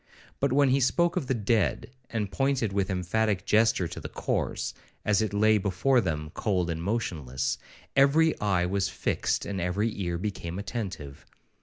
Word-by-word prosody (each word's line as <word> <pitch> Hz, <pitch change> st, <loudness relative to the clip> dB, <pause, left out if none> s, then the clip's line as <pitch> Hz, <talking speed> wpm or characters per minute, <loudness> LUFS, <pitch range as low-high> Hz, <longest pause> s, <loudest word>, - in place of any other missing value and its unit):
But 140 Hz, -1 st, +1 dB
when 140 Hz, 0 st, +4 dB
he 135 Hz, +2 st, +3 dB
spoke 170 Hz, +7 st, +2 dB
of 165 Hz, -8 st, -1 dB
the 130 Hz, -, +1 dB
dead, 110 Hz, 0 st, 0 dB, 0.2 s
and 105 Hz, -4 st, -2 dB
pointed 135 Hz, -6 st, 0 dB
with 100 Hz, -1 st, 0 dB
emphatic 95 Hz, +1 st, 0 dB
gesture 110 Hz, -4 st, +3 dB
to -, -, -7 dB
the -, -, -7 dB
corse, -, -, -2 dB, 0.3 s
as 105 Hz, -2 st, +3 dB
it 110 Hz, -, -1 dB
lay 105 Hz, +1 st, +4 dB
before 100 Hz, +7 st, +2 dB
them 75 Hz, -4 st, -3 dB
cold 90 Hz, -4 st, 0 dB
and 80 Hz, 0 st, -4 dB
motionless, 75 Hz, -, -2 dB, 0.4 s
every 150 Hz, +4 st, +5 dB
eye 95 Hz, -4 st, +1 dB
was 95 Hz, +1 st, 0 dB
fixed, -, -, -1 dB
and 95 Hz, -2 st, -3 dB
every 100 Hz, +6 st, 0 dB
ear 85 Hz, -2 st, -1 dB
became 90 Hz, -3 st, -4 dB
attentive. 95 Hz, -, -6 dB
100 Hz, 165 wpm, -28 LUFS, 90-115 Hz, 0.4 s, every